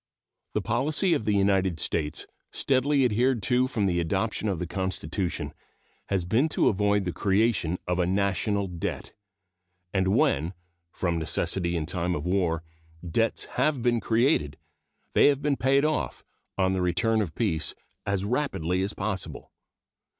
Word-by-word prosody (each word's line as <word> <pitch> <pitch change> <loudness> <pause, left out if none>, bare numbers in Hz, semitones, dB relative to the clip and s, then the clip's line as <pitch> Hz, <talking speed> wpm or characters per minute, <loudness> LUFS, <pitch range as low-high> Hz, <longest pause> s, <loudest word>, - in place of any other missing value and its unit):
The - - 0
policy 150 - +2
of 110 - -1
the 105 -1 +2
United 95 -4 +2
States, 75 0 -2 0.3
steadily 135 +1 +2
adhered 120 0 +2
to 125 +4 +2
from 110 -6 -1
the 90 -2 +1
adoption 100 +5 -1
of 95 - -1
the 90 - -3
Constitution, 95 0 -3 0.5
has 95 -3 0
been 120 - +2
to - - +3
avoid 105 -1 +1
the 90 - -1
creation 95 -3 +1
of 90 0 0
a 90 - +2
national 100 +1 +1
debt; 90 -3 -5 0.8
and 95 -1 +2
when, 85 -2 +2 0.4
from 85 -2 -1
necessity 85 +2 -1
in 80 - -2
time 90 +1 -1
of 75 - -4
war, 90 -3 0 0.4
debts 115 +7 0
have 140 -5 +1
been 120 -1 +3
created, 115 - +1 0.6
they - - +6
have 140 -1 +2
been 145 -1 +2
paid 135 +2 +3
off, 155 0 -1 0.3
on 95 -1 +2
the 95 - 0
return 95 +6 +2
of 85 -7 -4
peace, 80 -9 0 0.3
as 100 -1 -1
rapidly 100 - 0
as 100 +2 -2
possible. 100 -3 -4
100 Hz, 150 wpm, -27 LUFS, 90-115 Hz, 0.8 s, they